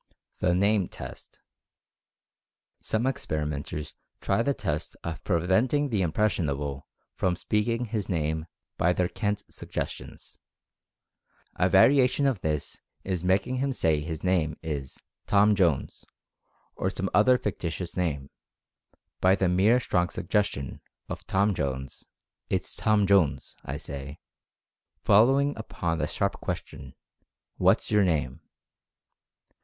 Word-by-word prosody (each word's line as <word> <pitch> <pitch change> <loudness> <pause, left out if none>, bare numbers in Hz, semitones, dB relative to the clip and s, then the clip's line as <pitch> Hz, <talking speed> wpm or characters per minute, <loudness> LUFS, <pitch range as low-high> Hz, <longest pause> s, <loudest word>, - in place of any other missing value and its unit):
THE 90 -1 +2
"NAME" 100 0 +2
TEST. - - -10 1.4
Some 110 +3 -1
experimenters 75 - -3 0.3
try 100 +4 +1
the 140 +3 +1
test 80 0 -3
of 85 -1 -5
preventing 105 - +2
the 105 -5 0
"impressionable" 75 -7 -1 0.3
from 90 -1 0
speaking 115 +5 0
his 110 -3 -3
name 80 -2 -1 0.3
by 90 +1 +3
their 90 0 +1
"CAN'T" 105 +1 -2
suggestions. - - -6 1.2
A - - +2
variation 135 0 +5
of 130 -9 +1
this 75 -2 -3 0.2
is 90 -3 -2
making 95 +8 +1
him 135 +1 0
say 80 - +1
his 80 +1 -5
name 85 -5 +1
is 70 -4 -4 0.3
"Tom 105 +1 +5
Jones," 85 -8 +1 0.7
or 95 - -1
some 95 0 -3
other 125 +6 +5
fic 105 -5 -3
titious 85 +1 -4
name, 75 -7 -2 0.9
by 95 +1 +5
the 95 - +1
mere 100 +7 +4
strong 90 -7 0
suggestion 85 -8 -2 0.3
of - - -7
"Tom 100 +2 +2
Jones, 65 -5 -4 0.4
it's - - -2
Tom 110 -2 +3
Jones, 95 -7 +2
I - - -4
say," 70 +1 -7 0.9
following 135 +7 +4
upon 85 -7 -3
the 75 - 0
sharp - - -2
question, 70 -2 -6 0.6
"What's - - +3
your 105 -1 +5
name?" 75 -8 0
90 Hz, 120 wpm, -27 LUFS, 80-105 Hz, 1.4 s, variation